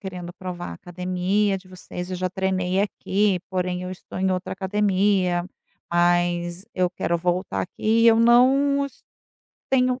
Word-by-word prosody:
querendo 180 -3 -7
provar 180 -1 -6
a - - -6
academia 185 - -1
de 185 - -19
vocês, 180 0 -8
eu 185 - -2
já 185 +1 -1
treinei 190 0 0
aqui, 200 -1 +1
porém, 180 -1 -2
eu 180 - -5
estou 185 0 -8
em 190 0 +1
outra 185 0 -2
academia, 190 -2 +1 0.5
mas 175 +1 +1
eu 180 -1 +2
quero 170 -1 -1
voltar 180 +2 -1
aqui 220 +5 0
e - - +7
eu 225 -1 +6
não, 270 +4 +4
es - - -16 0.7
tenho 255 -1 +2
185 Hz, 155 wpm, -24 LUFS, 180-205 Hz, 0.7 s, e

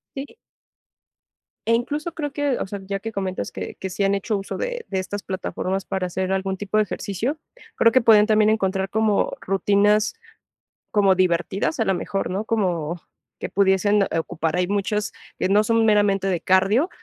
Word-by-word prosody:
Sí. 275 +1 -5 1.4
Eh, 230 - +3
incluso 295 +7 -2
creo 290 -3 -4
que, 285 -3 0
o - - -3
sea, 200 0 -6
ya 195 0 -3
que 225 +2 -6
comentas 190 -2 -3
que - - -6
que 190 - -5
sí 200 - -2
han 195 - +2
hecho 200 +2 -1
uso 195 - -5
de - - -4
de 190 - -2
estas 200 +2 -4
plataformas 190 0 -3
para 190 -2 -2
hacer 185 +1 -2
algún 190 0 -1
tipo 205 +2 -3
de 215 - +5
ejercicio, 220 - -3 0.4
creo 230 - +5
que 255 - +5
pueden 220 -3 +6
también 215 -1 +4
encontrar 195 -3 0
como, 220 -1 +1
rutinas 205 - +2 0.8
como 200 -2 +4
divertidas, 185 - 0
a 225 - +3
lo 195 - +1
mejor, 195 +2 -3
¿no? 195 +4 -2
Como 175 -7 -1 0.4
que - - -4
pudiesen, 200 +1 +3
eh, 180 - -1
ocupar. 165 0 -2
Hay 180 - +1
muchas 205 +1 -1 0.3
que - - 0
no 210 +2 +4
son 230 +1 +2
meramente 205 -2 +3
de 180 -3 0
cardio, 195 - +3
200 Hz, 185 wpm, -23 LUFS, 190-220 Hz, 1.4 s, pueden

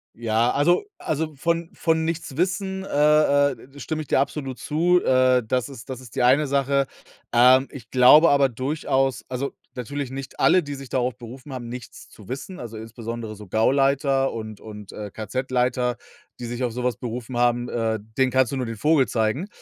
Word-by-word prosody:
Ja, 115 +1 +1
also 150 +5 +3 0.2
also, 155 0 -2
von 170 +3 -1
von 160 -1 0
nichts 160 -4 -4
wissen, 190 +2 -1
äh, 145 -2 +4
äh, 135 +3 -15
stimme 155 +2 -3
ich - - -17
dir - - +2
absolut 135 -2 -3
zu. 175 +4 +2
Äh, 130 -1 +4
das 125 +3 0
ist 130 -3 -11
das 130 -1 -6
ist 125 -3 -14
die - - 0
eine 135 +5 +4
Sache. 140 0 +1 0.5
Ähm, 130 +3 +6
ich 125 -4 -11
glaube 130 +6 +7
aber 140 -1 +4
durchaus 135 0 -1
also 130 +2 -4 0.2
natürlich 130 +2 -4
nicht 135 0 -8
alle, 185 - +5
die 145 -3 -6
sich 135 -2 -10
darauf 125 -1 -1
berufen 125 +4 -11
haben, 125 -3 -6
nichts 125 +1 -9
zu 105 - -16
wissen 140 +8 -6
also 115 -2 -7
insbesondere 115 0 -6
so 105 0 -12
Gauleiter 135 - +2
und 110 -2 -7
und, 105 -2 -10
äh, 105 -1 -7
KZ-Leiter, 125 +2 -1 0.4
die 120 - -5
sich 120 +2 -4
auf 120 - 0
so 125 +1 -4
was 125 -3 0
berufen 120 +1 -6
haben, 120 0 +2
äh, 110 -1 -1 0.2
denen 130 -1 +3
kannst 130 -2 +2
du 135 - -2
nur 125 -2 -2
den 115 -1 -5
Vogel 150 +1 +3
zeigen. 110 - -1
130 Hz, 190 wpm, -23 LUFS, 120-145 Hz, 0.5 s, glaube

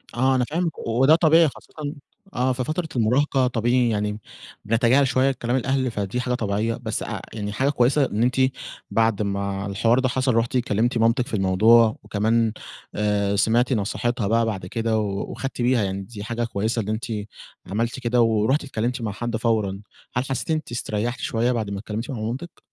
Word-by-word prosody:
آه، 130 +2 +3
أنا 125 -1 +2
فاهمِك، 165 +2 -2
وده 135 +7 +5
طبيعي 165 0 +5
خاصةً 145 +2 -8 0.4
آه، 130 +1 +1
في 125 0 -2
فترة 160 +4 -2
المراهقة 130 +3 +2
طبيعي 120 0 +2
يعني 105 0 -1 0.5
بنتجاهل 120 +5 +3
شوية 130 +2 +2
كلام 120 -1 -2
الأهل، 130 -1 0
فدي 105 +4 -2
حاجة 125 0 -1
طبيعية. 110 0 -1
بس 110 -2 -3
اع - - -5
يعني 105 -2 -4
حاجة 135 +6 +1
كويسة 135 +1 +3
إن 110 -1 -1
أنتِ 125 +1 +1 0.6
بعد 110 -2 +2
ما 100 0 -2
الحوار 115 +5 +2
ده 130 -1 +1
حصل، 130 -1 +1
رُحتِ 115 +2 +1
كلمتِ 120 +1 0
مامتِك 115 +3 +2
في 140 - -11
الموضوع 110 +4 +4
وكمان 110 +2 +1 0.4
آآ، 100 -1 +1
سمعتِ 120 +5 +2
نصيحتها 115 +1 -1
بَقى 115 +1 +2
بعد 100 -5 -3
كده 115 +3 -1
و 100 -2 -3
وخدتِ 135 -2 -5
بيها 120 -2 +3
يعني 95 0 -2
دي 100 0 -8
حاجة 120 +1 -3
كويسة 110 +1 -1
إن 105 - -5
أنتِ 110 +1 -2 0.6
عملتِ 115 +6 -2
كده 120 -1 +2
ورُحتِ 115 +6 +2
اتكلمتِ 125 -1 -2
مع 110 - -2
حد 120 +2 -3
فورًا. 110 -4 0 0.3
هل 125 - +1
حسيتِ 135 +4 -3
إن 160 - +3
أنتِ 155 -6 -5
إستريحتِ 120 +1 -2
شوية 120 +2 0
بعد 110 -4 -2
ما 100 0 -4
اتكلمتِ 110 +5 -5
مع 120 - -4
مامتِك؟ 125 +11 -5
115 Hz, 185 wpm, -23 LUFS, 105-125 Hz, 0.6 s, وده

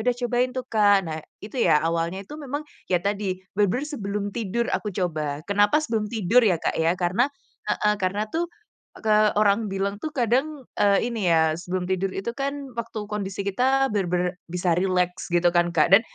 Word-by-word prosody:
udah 245 - -3
cobain 245 +1 +1
tuh, 255 0 -4
Kak. 210 -4 +4 0.2
Nah 155 - -4 0.2
itu 220 +4 -4
ya 150 - +5
awalnya 165 +2 -1
itu 300 - -9
memang 290 +1 -4 0.3
ya 180 - +4
tadi 200 -2 -1 0.2
bener-bener 210 +7 +1
sebelum 210 -9 -3
tidur 235 +1 -1
aku 210 - -2
coba, 155 -5 -2
kenapa 205 +4 +3
sebelum 225 -8 -1
tidur 225 +1 +3
ya, 190 -6 +3
Kak, - - -1
ya? 165 +2 +1
Karena 185 +10 +2 0.4
heeh, 210 0 +2
karena 195 +3 0
tuh 340 +1 -1 0.5
ke 220 -1 0 0.2
orang 210 +1 +3
bilang 200 +1 -2
tuh 315 - -3
kadang, 270 +2 0 0.2
eee, 205 +2 +3
ini 210 -6 0
ya, 160 -1 +4
sebelum 180 +1 -3
tidur 190 +1 0
itu 195 +5 -3
kan 275 0 -4
waktu 220 -2 -6
kondisi 200 -1 -3
kita 260 +5 +2
bener-bener 180 -2 -1
bisa 180 0 0
rileks 180 0 0
gitu 175 0 +3
kan 175 0 +3
Kak, 165 +4 +4
dan 195 - +9
200 Hz, 180 wpm, -24 LUFS, 180-235 Hz, 0.5 s, dan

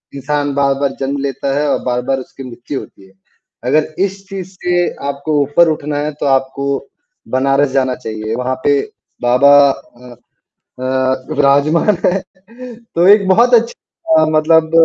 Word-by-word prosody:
इंसान 145 +1 -2
बार-बार 140 0 0
जन्म 135 +1 -2
लेता 135 0 -2
है 150 - 0
और - - +1
बार-बार 125 +2 -1
उसकी 135 +1 -10
मृत्यु 125 +2 -6
होती 95 - -14
है। 95 - -22 0.6
अगर 155 +2 +1
इस 195 0 -7
चीज़ 190 -2 -6
से 175 0 +1 0.2
आपको 145 +2 -1
ऊपर 145 +5 +3
उठना 150 -1 -3
है 150 +1 -2
तो - - -2
आपको 135 0 0 0.7
बनारस 135 +2 +2
जाना 130 -2 0
चाहिए 110 -2 -5
वहाँ 125 +1 -2
पे 145 -1 +3 0.4
बाबा 125 +4 +4 0.2
अ 125 -2 -13 0.7
अ, 130 0 -1
विराजमान 145 +8 +3
है। 190 +2 +1 0.7
तो 170 +2 +3
एक 205 -1 +6
बहुत 235 +6 +4
अच्छी 235 0 +2 0.4
अ, 155 - +4
मतलब 160 +1 +3
140 Hz, 150 wpm, -15 LUFS, 130-155 Hz, 0.7 s, एक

